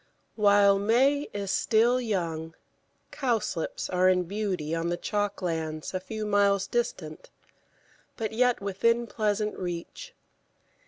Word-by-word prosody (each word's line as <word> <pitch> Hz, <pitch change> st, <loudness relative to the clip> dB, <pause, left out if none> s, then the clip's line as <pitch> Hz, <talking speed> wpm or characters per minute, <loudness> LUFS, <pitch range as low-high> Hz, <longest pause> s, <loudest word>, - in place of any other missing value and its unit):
While 200 Hz, -2 st, +5 dB
May 265 Hz, +8 st, +2 dB
is 200 Hz, -1 st, -3 dB
still 235 Hz, +5 st, +3 dB
young, 165 Hz, -7 st, -3 dB, 0.6 s
Cowslips 230 Hz, -, -2 dB
are 185 Hz, 0 st, +3 dB
in 180 Hz, -1 st, +3 dB
beauty 185 Hz, -5 st, -3 dB
on 165 Hz, +1 st, -1 dB
the 175 Hz, -, -1 dB
chalk 205 Hz, 0 st, -2 dB
lands 160 Hz, -2 st, -3 dB
a 185 Hz, -, -1 dB
few 215 Hz, +3 st, -5 dB
miles 200 Hz, -1 st, +2 dB
distant, 185 Hz, -11 st, -3 dB, 0.9 s
but 220 Hz, -3 st, -3 dB
yet 245 Hz, +1 st, +2 dB
within 230 Hz, +5 st, +1 dB
pleasant 210 Hz, -2 st, -1 dB
reach. 180 Hz, -, -6 dB
200 Hz, 120 wpm, -27 LUFS, 180-225 Hz, 0.9 s, While